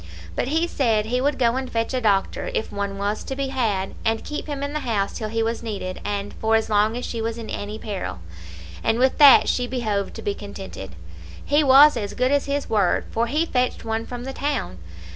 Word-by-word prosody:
But -, -, -1 dB
he 320 Hz, +4 st, +1 dB
said 230 Hz, -10 st, +1 dB
he 250 Hz, +3 st, 0 dB
would 285 Hz, +1 st, +1 dB
go 240 Hz, -1 st, +2 dB
and 260 Hz, -1 st, -4 dB
fetch 230 Hz, +2 st, -1 dB
a 255 Hz, -, 0 dB
doctor, 205 Hz, -, +1 dB
if 460 Hz, -, -2 dB
one 200 Hz, -1 st, -3 dB
was 205 Hz, +2 st, -2 dB
to 270 Hz, -, -5 dB
be 275 Hz, 0 st, -2 dB
had, 215 Hz, -8 st, -1 dB
and 225 Hz, 0 st, 0 dB
keep 300 Hz, -, -5 dB
him 285 Hz, -2 st, -4 dB
in 285 Hz, +1 st, -3 dB
the 300 Hz, -, -1 dB
house 220 Hz, -7 st, -1 dB
till 215 Hz, -, -4 dB
he 225 Hz, +1 st, 0 dB
was 230 Hz, +1 st, -2 dB
needed, 200 Hz, -5 st, -5 dB
and 205 Hz, 0 st, -3 dB
for 225 Hz, 0 st, +1 dB
as 220 Hz, 0 st, 0 dB
long 215 Hz, +2 st, +3 dB
as 250 Hz, -, -4 dB
she 230 Hz, -, -4 dB
was 225 Hz, +1 st, -2 dB
in 230 Hz, -1 st, -7 dB
any 205 Hz, +1 st, -4 dB
peril; 205 Hz, -, -5 dB, 0.7 s
and 225 Hz, -, +2 dB
with 260 Hz, +4 st, +2 dB
that 285 Hz, -2 st, +9 dB
she 250 Hz, -1 st, +1 dB
behoved 215 Hz, -6 st, -2 dB
to -, -, -7 dB
be 205 Hz, -, 0 dB
contented. 195 Hz, -, -8 dB, 0.5 s
He 295 Hz, +2 st, +3 dB
was 280 Hz, +2 st, +8 dB
as 205 Hz, -3 st, -4 dB
good 255 Hz, +1 st, +1 dB
as 285 Hz, -1 st, +2 dB
his 280 Hz, 0 st, -1 dB
word, 205 Hz, -5 st, +1 dB
for 230 Hz, +1 st, 0 dB
he 305 Hz, +7 st, +1 dB
fetched 250 Hz, -7 st, -1 dB
one 225 Hz, 0 st, -2 dB
from 245 Hz, -1 st, -6 dB
the 270 Hz, +1 st, -5 dB
town. 175 Hz, -, -2 dB
230 Hz, 230 wpm, -23 LUFS, 205-265 Hz, 0.7 s, that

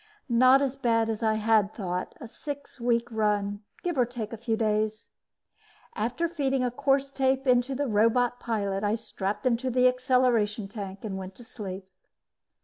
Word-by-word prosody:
Not 255 Hz, +3 st, +6 dB
as 270 Hz, -1 st, -1 dB
bad 230 Hz, -4 st, +1 dB
as 220 Hz, -, -4 dB
I 220 Hz, -1 st, +2 dB
had 215 Hz, -1 st, +3 dB
thought 180 Hz, -4 st, -4 dB
a 235 Hz, -, -8 dB
six 285 Hz, +3 st, -8 dB
week 235 Hz, 0 st, +1 dB
run, 205 Hz, -2 st, 0 dB, 0.2 s
give 345 Hz, -6 st, -1 dB
or 245 Hz, -, +5 dB
take 235 Hz, -3 st, -6 dB
a -, -, -5 dB
few 225 Hz, 0 st, -1 dB
days. 215 Hz, 0 st, -1 dB, 0.8 s
After 245 Hz, +10 st, -1 dB
feeding 270 Hz, -6 st, 0 dB
a 250 Hz, -, 0 dB
course 275 Hz, +1 st, +1 dB
tape 265 Hz, 0 st, +1 dB
into 250 Hz, +1 st, +3 dB
the 285 Hz, +2 st, -1 dB
robot 240 Hz, +2 st, +2 dB
pilot, 200 Hz, -4 st, -2 dB
I 205 Hz, +1 st, +2 dB
strapped 210 Hz, 0 st, -4 dB
into 255 Hz, +1 st, +1 dB
the 250 Hz, 0 st, +4 dB
acceleration 250 Hz, -5 st, +2 dB
tank 195 Hz, -2 st, -7 dB
and 190 Hz, -2 st, -4 dB
went 190 Hz, 0 st, -8 dB
to 245 Hz, -, -13 dB
sleep. 195 Hz, -5 st, -7 dB
230 Hz, 170 wpm, -27 LUFS, 210-255 Hz, 0.8 s, Not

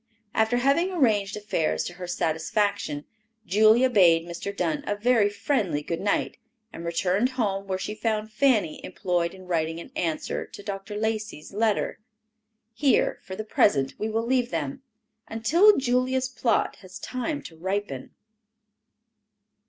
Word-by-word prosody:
After 220 Hz, +2 st, +2 dB
having 280 Hz, +9 st, +2 dB
arranged 215 Hz, -, +1 dB
affairs 205 Hz, -6 st, -1 dB
to 175 Hz, -, -5 dB
her 180 Hz, 0 st, -7 dB
satisfaction, 175 Hz, -1 st, -1 dB, 0.4 s
Julia 215 Hz, +6 st, +5 dB
bade 175 Hz, -8 st, +5 dB
Mr. 175 Hz, +3 st, -5 dB
Dunn 160 Hz, -4 st, -1 dB
a 205 Hz, -, 0 dB
very 220 Hz, -1 st, +3 dB
friendly 200 Hz, -, -1 dB
good 165 Hz, +2 st, -3 dB
night, 200 Hz, 0 st, 0 dB, 0.4 s
and 165 Hz, -, -7 dB
returned 180 Hz, +7 st, +1 dB
home 195 Hz, -4 st, -1 dB
where 190 Hz, -1 st, -1 dB
she 210 Hz, -, -4 dB
found 215 Hz, -1 st, -2 dB
Fanny 225 Hz, -, +2 dB
employed 175 Hz, -1 st, -1 dB
in 185 Hz, -1 st, -13 dB
writing 165 Hz, -2 st, -1 dB
an -, -, -10 dB
answer 160 Hz, -3 st, -2 dB
to 205 Hz, -, -11 dB
Dr. 200 Hz, +1 st, -5 dB
Lacey's 215 Hz, -6 st, -3 dB
letter. 215 Hz, 0 st, 0 dB, 0.7 s
Here, 265 Hz, +4 st, +2 dB
for 190 Hz, -, -8 dB
the 215 Hz, -, -4 dB
present, 140 Hz, -10 st, +2 dB
we 215 Hz, -, -1 dB
will 225 Hz, +1 st, -1 dB
leave 250 Hz, -1 st, +1 dB
them, 150 Hz, -, -3 dB, 0.5 s
until 335 Hz, -, +4 dB
Julia's 255 Hz, 0 st, +1 dB
plot 240 Hz, -2 st, 0 dB
has 185 Hz, -1 st, -11 dB
time 255 Hz, +7 st, -4 dB
to 165 Hz, -, -10 dB
ripen. 185 Hz, -6 st, -3 dB
205 Hz, 145 wpm, -26 LUFS, 175-230 Hz, 0.7 s, Julia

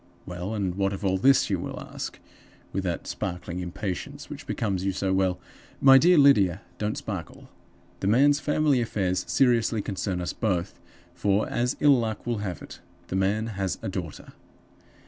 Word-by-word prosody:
Well, 90 Hz, +4 st, -5 dB
and 95 Hz, -4 st, -1 dB
what 95 Hz, +1 st, 0 dB
of 100 Hz, +1 st, -5 dB
all 95 Hz, 0 st, +1 dB
this? 135 Hz, +6 st, +4 dB
you -, -, +1 dB
will -, -, -5 dB
ask, -, -, -7 dB, 0.6 s
with 95 Hz, -, -1 dB
that 85 Hz, -2 st, -3 dB
sparkling 90 Hz, -1 st, -4 dB
impatience 90 Hz, +1 st, -5 dB
which -, -, -8 dB
becomes 95 Hz, -4 st, -1 dB
you 95 Hz, -, +1 dB
so 95 Hz, 0 st, -1 dB
well. 95 Hz, -1 st, +1 dB, 0.4 s
My 135 Hz, -1 st, +8 dB
dear 175 Hz, +4 st, +5 dB
Lydia, 105 Hz, -, +5 dB, 0.2 s
don't 105 Hz, 0 st, -2 dB
sparkle! 95 Hz, -7 st, -7 dB, 0.5 s
The -, -, -2 dB
man's 140 Hz, +7 st, +4 dB
family 150 Hz, -3 st, +2 dB
affairs 95 Hz, -5 st, -1 dB
seriously 120 Hz, -4 st, +2 dB
concern 95 Hz, -2 st, -3 dB
us 90 Hz, -, -3 dB
both, 95 Hz, -5 st, -2 dB, 0.3 s
for, 100 Hz, +1 st, +1 dB
as 125 Hz, +1 st, -1 dB
ill 145 Hz, -3 st, +5 dB
luck 110 Hz, -2 st, -3 dB
will 120 Hz, -3 st, -1 dB
have 95 Hz, -4 st, -5 dB
it, -, -, -11 dB, 0.3 s
the -, -, -3 dB
man 100 Hz, +3 st, +1 dB, 0.2 s
has 95 Hz, -2 st, 0 dB
got -, -, -12 dB
a -, -, -1 dB
daughter! -, -, -6 dB
100 Hz, 175 wpm, -26 LUFS, 95-120 Hz, 0.6 s, My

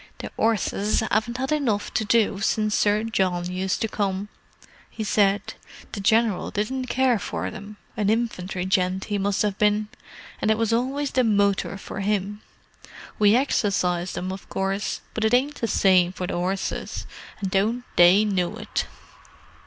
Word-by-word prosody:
"The -, -, -7 dB
'orses 215 Hz, -1 st, +1 dB
'aven't 220 Hz, +3 st, -1 dB
'ad 265 Hz, +2 st, -2 dB
enough 245 Hz, -9 st, 0 dB
to -, -, +1 dB
do 210 Hz, -2 st, +2 dB
since 215 Hz, +1 st, 0 dB
Sir 210 Hz, +1 st, +2 dB
John 180 Hz, -5 st, -1 dB
used 185 Hz, +1 st, -2 dB
to 225 Hz, -, +1 dB
come," 200 Hz, -1 st, -2 dB, 0.6 s
he 220 Hz, -, -5 dB
said. 205 Hz, -1 st, +1 dB, 0.4 s
"The 205 Hz, -, -5 dB
General 220 Hz, 0 st, +2 dB
didn't 255 Hz, +5 st, -2 dB
care 255 Hz, -3 st, +2 dB
for -, -, -4 dB
them—an 210 Hz, 0 st, -5 dB
infantry 190 Hz, -5 st, -1 dB
gent 185 Hz, 0 st, +1 dB
he 205 Hz, -1 st, -2 dB
must 200 Hz, +1 st, +1 dB
have 205 Hz, -2 st, -2 dB
been—and 210 Hz, 0 st, -2 dB
it 220 Hz, -, +3 dB
was 225 Hz, 0 st, +1 dB
always 270 Hz, +4 st, 0 dB
the 255 Hz, -, +2 dB
motor 200 Hz, -3 st, +1 dB
for 195 Hz, -, -7 dB
'im. 205 Hz, +1 st, -1 dB, 0.8 s
We 210 Hz, +1 st, +5 dB
exercised 185 Hz, -8 st, 0 dB
'em, 185 Hz, +1 st, -3 dB
of 190 Hz, -, -9 dB
course, 195 Hz, +1 st, -2 dB
but 220 Hz, -, -2 dB
it 220 Hz, +2 st, +4 dB
ain't 285 Hz, +4 st, 0 dB
the 230 Hz, -, +1 dB
same 185 Hz, -3 st, +3 dB
to 185 Hz, -, -4 dB
the -, -, -4 dB
'orses, 185 Hz, +2 st, -3 dB, 0.3 s
and 195 Hz, -3 st, -3 dB
don't 220 Hz, +6 st, +1 dB
they 180 Hz, +5 st, +6 dB
know 185 Hz, -4 st, -1 dB
it!" -, -, -3 dB
205 Hz, 160 wpm, -24 LUFS, 190-225 Hz, 0.8 s, they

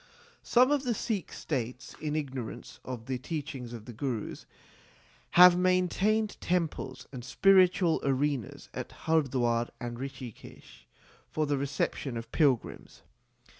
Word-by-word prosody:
Some 255 Hz, +3 st, +4 dB
of 290 Hz, -2 st, +3 dB
the 245 Hz, -3 st, 0 dB
Sikh 205 Hz, -, -2 dB
States, 125 Hz, -3 st, -4 dB
in 150 Hz, -1 st, -2 dB
ignorance 135 Hz, -6 st, -5 dB
of 125 Hz, -3 st, -6 dB
the 130 Hz, -1 st, -3 dB
teachings 140 Hz, -4 st, -5 dB
of 115 Hz, -3 st, -8 dB
the 120 Hz, -, -8 dB
Gurus, 115 Hz, -2 st, -4 dB, 0.9 s
have 180 Hz, 0 st, +10 dB
maintained 185 Hz, +4 st, +2 dB
temples 165 Hz, -7 st, -2 dB
and 125 Hz, -3 st, -7 dB
spiritual 185 Hz, +3 st, +4 dB
arenas 140 Hz, -3 st, -1 dB
at -, -, -5 dB
Hardwar 125 Hz, -7 st, +2 dB
and 120 Hz, -1 st, -5 dB
Rikhikesh 130 Hz, -4 st, -9 dB, 0.4 s
for 155 Hz, -, 0 dB
the 145 Hz, -1 st, 0 dB
reception 140 Hz, -2 st, -2 dB
of 115 Hz, -, -7 dB
pilgrims. 140 Hz, -7 st, 0 dB
140 Hz, 125 wpm, -30 LUFS, 125-175 Hz, 0.9 s, have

